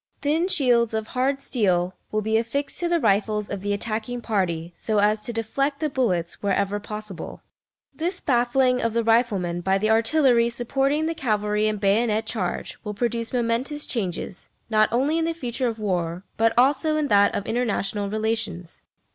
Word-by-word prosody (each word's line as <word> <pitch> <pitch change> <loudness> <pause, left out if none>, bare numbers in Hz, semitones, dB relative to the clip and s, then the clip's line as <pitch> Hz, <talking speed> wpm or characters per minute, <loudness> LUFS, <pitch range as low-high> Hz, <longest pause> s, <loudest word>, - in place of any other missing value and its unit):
Thin 315 +5 +2
shields 240 - +3
of 220 0 -3
hard 270 +2 0
steel 185 -7 +1 0.2
will 215 0 0
be 220 +1 0
affixed 235 +6 -1
to 345 - 0
the 345 -1 +2
rifles 210 -2 +1
of 200 -2 -5
the 205 +1 -2
attacking 220 +3 -2
party, 175 -7 -2
so 215 -1 -2
as 210 +1 +3
to 240 - -4
deflect 275 +6 -1
the 310 -2 -1
bullets 185 -11 -1
wherever 200 0 0
possible. 210 -3 -7 0.5
This 355 +4 -2
baffling 250 0 +2
of 230 -1 0
the 230 0 +1
rifleman 210 -7 +1
by 190 +2 +2
the 215 +2 +1
artillery 235 +1 +3
supporting 270 +6 0
the 330 - -1
cavalry 210 -6 0
and 215 -1 -1
bayonet 215 +2 +2
charge 200 -5 -3
will 210 -2 -5
produce 230 +1 -2
momentous 250 +5 -1
changes, 190 -4 -4 0.2
not 215 0 +4
only 280 +7 +1
in 325 - +1
the 330 0 -1
future 250 -4 -2
of 225 -2 -3
war, 180 -4 -2
but 225 0 +3
also 285 +5 +3
in 300 -1 0
that 205 0 +4
of 200 - -2
international 210 -4 -1
relations. 215 -5 -3
225 Hz, 170 wpm, -24 LUFS, 205-255 Hz, 0.5 s, not